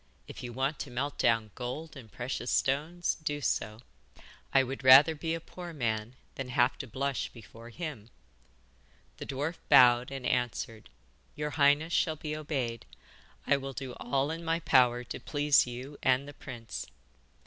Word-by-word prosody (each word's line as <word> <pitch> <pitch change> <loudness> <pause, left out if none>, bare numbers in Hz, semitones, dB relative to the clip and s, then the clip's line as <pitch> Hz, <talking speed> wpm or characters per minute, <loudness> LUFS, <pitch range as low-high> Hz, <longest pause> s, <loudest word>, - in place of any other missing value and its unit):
If - - -9
you 125 -2 -6
want 135 +5 -1
to 140 - -5
melt 130 +4 -3
down 115 -3 +2
gold 140 +6 -6
and 115 -6 -12
precious 120 0 -4
stones, 155 +6 0
do 145 -1 -2
so. 110 -4 -2 0.7
I 135 - +5
would 130 +1 -6
rather 135 +5 +9
be 160 +2 -2
a - - -4
poor 175 +1 -9
man 115 -4 -2 0.2
than 135 -2 -6
have 125 0 +2
to 135 - -5
blush 135 +3 -2
before 115 0 -13
him.' 130 -6 -7 1.1
The - - -7
dwarf 145 +5 -3
bowed 125 0 +7
and 135 -2 -6
answered: 120 - -2 0.5
'Your 150 0 -3
highness 145 +3 +3
shall 160 -2 +2
be 150 0 -5
obeyed. 135 -7 -3 0.6
I 140 - +3
will 135 0 -6
do 130 -1 -6
all 140 +2 0
in 165 +1 -5
my 165 0 0
power 125 -5 +4
to 125 - -7
please 145 -3 +3
you 130 +4 -8
and 130 +2 +2
the 145 - -9
prince. 120 -5 -8
135 Hz, 165 wpm, -30 LUFS, 120-150 Hz, 1.1 s, rather